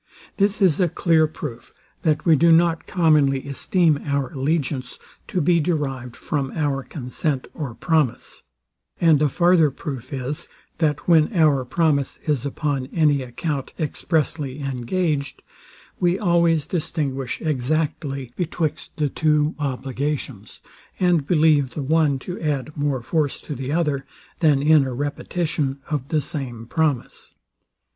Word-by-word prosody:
This 200 +1 +2
is 175 -6 +4
a 180 -2 +3
clear 160 -1 +3
proof, 120 -6 -8 0.3
that 150 -2 +1
we 165 -3 +6
do 165 +3 +5
not 165 0 +3
commonly 150 -6 +2
esteem 155 +2 +1
our 140 -2 -1
allegiance 135 -2 -1 0.3
to 180 - -1
be 170 +3 +3
derived 135 -7 -2
from 140 -3 -2
our 145 -3 0
consent 130 +1 -3
or 135 -7 -5
promise; 155 -6 0 0.6
and 160 -4 +4
a 150 - +3
farther 170 0 +4
proof 130 -2 -7
is, 135 +1 -3 0.3
that 150 -3 0
when 160 0 +5
our 150 -6 +4
promise 145 -1 +1
is 145 -3 0
upon 140 -2 -2
any 150 -2 +2
account 135 +3 -4
expressly 150 -3 -1
engaged, 140 +3 -2 0.6
we 175 +1 +2
always 170 -5 +2
distinguish 145 -6 -3
exactly 140 -2 -2
betwixt 165 -3 -2
the 150 -2 +1
two 150 +1 +1
obligations, 135 -4 -4 0.4
and 175 -6 +2
believe 150 -6 +3
the 145 - -3
one 150 -1 +2
to 180 +7 -7
add 150 -1 -2
more 145 -4 -1
force 145 +2 0
to 150 - -6
the 135 +1 -4
other, 150 -4 0 0.4
than 150 -5 +3
in 155 -1 +6
a 130 -2 -4
repetition 145 0 -2
of 140 -3 -2
the 155 +1 +1
same 130 -8 -5
promise. 150 0 -2
150 Hz, 135 wpm, -22 LUFS, 135-160 Hz, 0.6 s, we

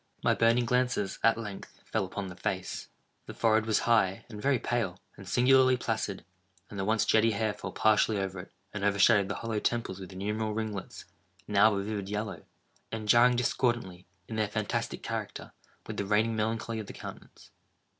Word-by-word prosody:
My - - +4
burning 115 +1 +3
glances 125 -5 0
at 115 0 +4
length 105 -4 -8
fell - - -1
upon 100 +2 -5
the 90 -2 -8
face. 95 -1 -4 0.4
The - - -8
forehead 110 -1 +2
was 110 - +2
high, 105 -5 +2
and 105 -2 -8
very 140 +1 +3
pale, 110 -6 -2 0.2
and 100 -2 -11
singularly 130 0 +5
placid; 110 -5 -3 0.5
and 100 - -6
the 95 - -1
once 110 +1 +2
jetty 110 +1 +4
hair 105 +1 0
fell 105 - -7
partially 110 0 +3
over 95 -1 -3
it, 90 - -10 0.2
and 105 -1 -4
overshadowed 100 0 +4
the - - -2
hollow 115 -2 -2
temples 115 -5 -1
with 95 0 -9
innumerable 105 +3 -2
ringlets, 110 -3 -5 0.4
now 105 +1 +5
of 100 - -1
a - - -4
vivid 100 -2 -4
yellow, 105 -1 -4 0.5
and 110 -1 -5
jarring 120 +2 +6
discordantly, 120 -7 -1 0.2
in 110 - -5
their 110 -1 +1
fantastic 105 0 -3
character, - - -5 0.3
with - - -6
the 100 - -1
reigning 110 +2 +2
melancholy 110 +1 -2
of 105 - -6
the - - -8
countenance. - - -11
110 Hz, 185 wpm, -29 LUFS, 100-115 Hz, 0.5 s, jarring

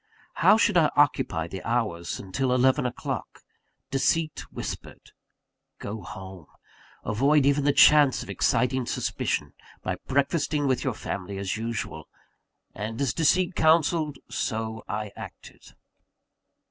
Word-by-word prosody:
How 215 - +7
should 210 -4 +3
I 155 -3 +5
occupy 110 - +2
the 95 +2 -7
hours 105 -8 -2
until 125 +7 -1
eleven 130 0 +3
o'clock? 125 - -5 0.5
Deceit 155 +3 0
whispered: - - -7 0.7
Go 105 +1 -6
home; 95 -3 -10 0.6
avoid 140 +6 +3
even 140 0 +2
the 145 - +5
chance 145 -1 +6
of - - -12
exciting 125 +1 +1
suspicion, - - -2 0.3
by - - -2
breakfasting 145 +2 +1
with 130 -2 +1
your - - -1
family 95 +2 -5
as 95 -1 -2
usual. 110 -8 -5 0.6
And 110 +3 -5
as 140 -4 0
deceit 175 +4 +2
counselled, 160 -2 +2
so 110 -1 -3
I 105 0 -4
acted. - - -11
130 Hz, 120 wpm, -26 LUFS, 105-145 Hz, 0.7 s, How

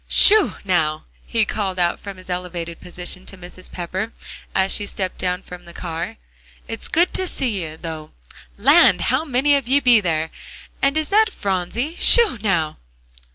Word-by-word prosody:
"Sho, 425 -1 +6
now!" 155 -5 0 0.2
he 225 -2 +2
called 195 -3 -3
out 175 -1 +1
from 200 -2 -9
his 185 - -14
elevated 180 -2 -5
position 180 +1 -6
to 195 - -9
Mrs. 180 +1 -9
Pepper, 185 +5 -4 0.4
as 190 0 +2
she 205 - -1
stepped 190 -2 -4
down 180 0 -2
from 180 0 -11
the 170 - -13
car, 170 -1 -5 0.5
"it's - - -4
good 340 +3 +1
to 375 - +1
see 230 - -1
you, 160 0 -8
though. 160 -2 -7 0.5
Land! 285 +11 +5
how - - +1
many 285 0 +2
of 275 -4 -2
ye 275 +3 +3
be 245 -4 +5
there? 160 -3 -1 0.5
And 275 +2 +2
is 310 -1 -1
that 435 +2 +4
Phronsie? 205 - -3
Sho, 455 - +6
now!" 170 -7 0
190 Hz, 170 wpm, -20 LUFS, 175-260 Hz, 0.5 s, Sho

